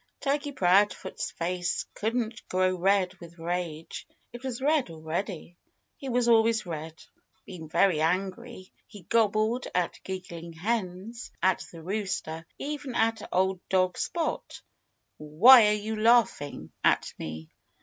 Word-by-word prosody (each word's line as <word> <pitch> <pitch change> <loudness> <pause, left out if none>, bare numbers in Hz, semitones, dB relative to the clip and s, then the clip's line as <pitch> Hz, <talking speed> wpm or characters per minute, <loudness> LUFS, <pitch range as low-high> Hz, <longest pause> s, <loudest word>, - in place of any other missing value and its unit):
Turkey 285 +1 -1
Proudfoot's 195 -4 +2
face 175 +1 -2
couldn't 225 0 -2
grow 185 0 +2
red 185 0 +2
with 170 0 -12
rage. 165 -1 -4 0.3
It 240 - -8
was 255 -3 -4
red 290 - +2
already. 165 +2 -5 0.4
It 270 - -5
was 245 -1 +1
always 225 -1 +4
red. 160 -1 -6 0.5
Being 170 -5 -9
very 170 -2 +3
angry, 190 +5 -2
he 205 -4 -13
gobbled 220 +4 +1
at 180 -1 +1
the - - -16
giggling 170 -3 -7
hens, 205 +4 -3
at 185 -1 +2
the 165 -2 -11
rooster, 185 -4 -3
even 290 -3 -5
at 225 0 +1
old 190 0 +1
dog 185 -1 +2
Spot, 330 -2 -3 0.5
"Why 210 - +7
are 210 - +3
you 210 +1 -3
laughing 215 - +2
at - - +2
me?" 80 0 -7
190 Hz, 130 wpm, -28 LUFS, 170-230 Hz, 0.5 s, Why